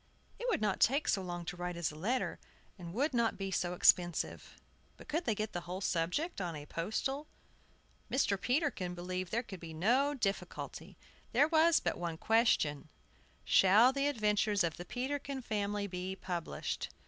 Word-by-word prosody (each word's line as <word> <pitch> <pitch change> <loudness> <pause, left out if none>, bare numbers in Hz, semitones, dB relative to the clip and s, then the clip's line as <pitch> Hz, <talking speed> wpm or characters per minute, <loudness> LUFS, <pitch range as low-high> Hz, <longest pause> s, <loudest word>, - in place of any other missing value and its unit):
It - - -2
would 455 - +1
not 210 -3 +1
take 280 +5 +3
so 195 - +2
long 175 -2 -5
to 175 - -4
write 180 -1 -4
as 170 -2 -1
a - - -12
letter, 230 +11 -1 0.4
and 170 -1 -7
would 275 - 0
not 235 -2 +1
be 195 -1 -3
so 180 0 -1
expensive. 175 -1 +2 0.4
But - - -13
could 325 +3 -1
they 220 - +1
get 215 +1 -3
the 175 - -1
whole 185 +1 -3
subject 190 - -1
on 175 -3 -3
a 145 -1 -7
postal? 265 - -2 0.8
Mr. 255 -6 +2
Peterkin 250 - 0
believed 180 0 -4
there 235 +2 0
could 195 -5 -9
be 165 -1 -8
no 255 - +2
difficulty, 200 -6 -4 0.4
there 275 +5 +5
was 325 +1 +5
but - - -2
one 170 -2 -3
question: 160 -10 +2 0.6
Shall 215 +7 +6
the 275 +1 +1
adventures 210 -5 +2
of 165 -2 -1
the 175 - -7
Peterkin 265 +3 -3
family 205 -2 -1
be 185 0 -4
published? 175 -3 -4
200 Hz, 170 wpm, -33 LUFS, 175-255 Hz, 0.8 s, Shall